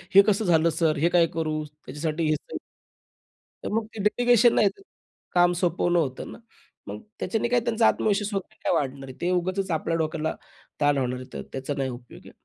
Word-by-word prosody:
हे 200 - +11
कसं 210 0 +2
झालं 170 -1 +4
सर? 160 -2 +2
हे 165 +4 +2
काय 175 -1 +6
करू?" 155 -1 -1 0.2
त्याच्यासाठी 155 +4 -2
हे 155 - +3 0.2
तर - - -3 1.1
तर - - -4
मग 225 0 0
ते - - -7
डेलिगेशन 240 +2 +4
नाही, 205 - +4
ते 395 - -18 0.5
काम 175 0 +4
सोपवणं 175 0 +1
होतं 135 -5 -3
ना. - - -10 0.5
मग - - -6 0.2
त्याच्याने 225 +1 -1
काय 245 0 +3
त्यांचा 230 -1 +2
आत्मविश्वास 205 0 +1
वगैरे 195 -2 -5
काय - - +1
वाढणार 135 -1 -2
आहे. - - -8
ते 175 - 0
उगाचच 185 +2 -1
आपल्या 165 +1 0
डोक्याला 155 -1 -1 0.5
ताण 145 -1 +3
होणार 125 -1 -1
आहे. 130 - -8
तर - - -5
त्याचा 135 +2 -4
नाही 135 -1 -1
उपयोग 120 -1 -10
आहे. - - -12
170 Hz, 200 wpm, -25 LUFS, 150-200 Hz, 1.1 s, हे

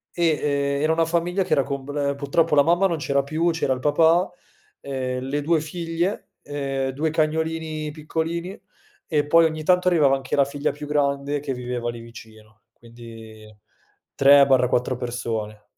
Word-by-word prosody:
Eh, 175 - -1 0.5
ehm, - - -2
era 155 +1 +2
una 165 0 +2
famiglia 175 +3 0
che - - -12
era 140 - +3
com 140 0 -5
ehm, 140 -1 0
purtroppo 150 +2 +1
la 145 - +6
mamma 175 +5 +3
non 170 - -2
c'era 140 -2 0
più, 160 +4 0
c'era 160 -5 0
il 130 - -5
papà, 160 +6 +3 0.5
ehm, 130 -2 -4
le 140 +3 -2
2 160 +2 +2
figlie, 170 +4 -3
ehm, 135 -2 -3
2 150 +4 -1
cagnolini 160 -1 -2
piccolini 165 +4 -4 0.5
e 150 -2 +1
poi 165 +2 +5
ogni 155 -1 -2
tanto 180 +2 +2
arrivava 150 -6 +4
anche 135 -1 -3
la 140 - +4
figlia 140 +1 -2
più 145 +1 -9
grande, 140 0 0
che 140 -2 -4
viveva 125 -1 -4
lì 120 0 -6
vicino, 110 -2 -14
quindi 115 -2 -13 0.6
3/4 135 -3 +4
persone. 115 -3 -4
145 Hz, 165 wpm, -23 LUFS, 130-160 Hz, 0.6 s, la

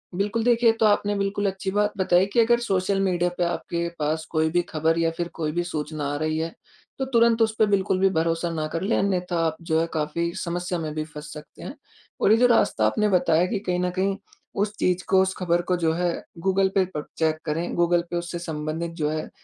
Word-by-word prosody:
बिल्कुल 205 +4 0
देखिए, 235 -1 +4
ये 225 - +3
तो 220 - +4
आपने 205 0 +2
बिल्कुल 200 +1 -1
अच्छी 190 0 -4
बात 210 +1 +1
बताई 185 -1 +3
कि 240 - +3
अगर 235 +1 +4
सोशल 195 -3 0
मीडिया 180 -2 +1
पे 175 - +1
आपके 170 0 -2
पास 155 +2 -1
कोई 160 0 +2
भी 175 +2 +2
ख़बर 160 +1 +1
या 165 - +2
फ़िर 175 - -1
कोई 155 -2 -2
भी 175 +3 -1
सूचना 155 -3 -4
आ - - -2
रही 155 +1 -1
है 165 +1 -3 0.5
तो 265 - 0
तुरंत 235 -2 +3
उस 220 -1 +2
पे 220 - +5
बिल्कुल 190 -2 +1
भी 195 - +4
भरोसा 165 -1 0
ना 155 -2 -2
कर 165 - -2
लें 200 +4 +1
अन्यथा 180 -3 0
आप 160 -1 -1
जो 160 -1 0
है 165 - 0
काफ़ी 160 +2 -1
समस्या 175 0 -3
में 155 -2 -4
भी 155 - -1
फँस 150 0 -10
सकते 150 0 -12
हैं। 275 - -7 0.5
और 205 - +4
ये 225 - +6
जो 245 +1 +5
रास्ता 225 - +3
आपने 210 - +2
बताया 175 -3 +3
कि 205 - -2
कहीं 180 -2 -2
न 180 - 0
कहीं 195 +1 0 0.4
उस 205 +1 0
चीज़ 180 0 +1
को 190 0 +4
उस 190 0 0
ख़बर 175 -1 +1
को 180 +1 0
जो 165 -2 +1
है 175 0 0 0.3
गूगल 190 +1 +2
पे 190 -1 +4
पर 150 -5 -6
चेक 160 -1 +1
करें, 165 +2 -2
गूगल 175 0 +3
पे - - -4
उससे 175 0 -4
संबंधित 160 0 -4
जो 150 - +1
है 155 0 -3
175 Hz, 240 wpm, -24 LUFS, 160-195 Hz, 0.5 s, ये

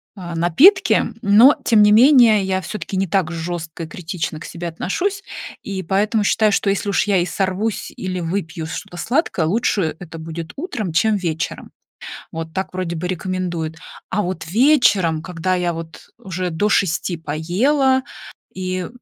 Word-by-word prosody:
а, 175 -4 -7
напитки. 275 - +5 0.2
Но, 220 +7 +7
тем 220 -3 +5
не 210 0 +6
менее, 235 -3 +6
я 190 0 -1
все-таки 200 +2 -6
не 190 +1 0
так 175 -1 0
жестко 165 -1 -5
и - - -6
критично 160 -1 -5
к - - -9
себе 175 0 -6
отношусь, 385 - -2 0.4
и 195 -2 -4
поэтому 205 +5 +1
считаю, 215 +1 +3
что 200 - +1
если 200 +1 -1
уж 200 - +1
я 200 -2 +3
и 175 - +2
сорвусь, 190 +4 -2
или 185 -1 -4
выпью 165 -2 -3
что-то 170 +2 -7
сладкое, 240 - 0
лучше 195 -3 0
это 165 -2 -9
будет 160 0 -7
утром, 255 - -4
чем 210 +7 +3
вечером. 165 -4 -3 0.6
Вот 160 0 -6
так 190 0 -3
вроде 180 -2 -3
бы 175 +2 -3
рекомендуют. 175 -3 -3 0.3
А 210 - 0
вот 175 -3 -4
вечером, 205 - +3
когда 180 +1 -2
я 175 -1 -1
вот 165 0 -9
уже 185 -5 -4
до 175 +6 0
6 180 -3 +1
поела, 220 - +1 0.5
и 185 -1 -3
185 Hz, 160 wpm, -20 LUFS, 165-210 Hz, 0.6 s, Но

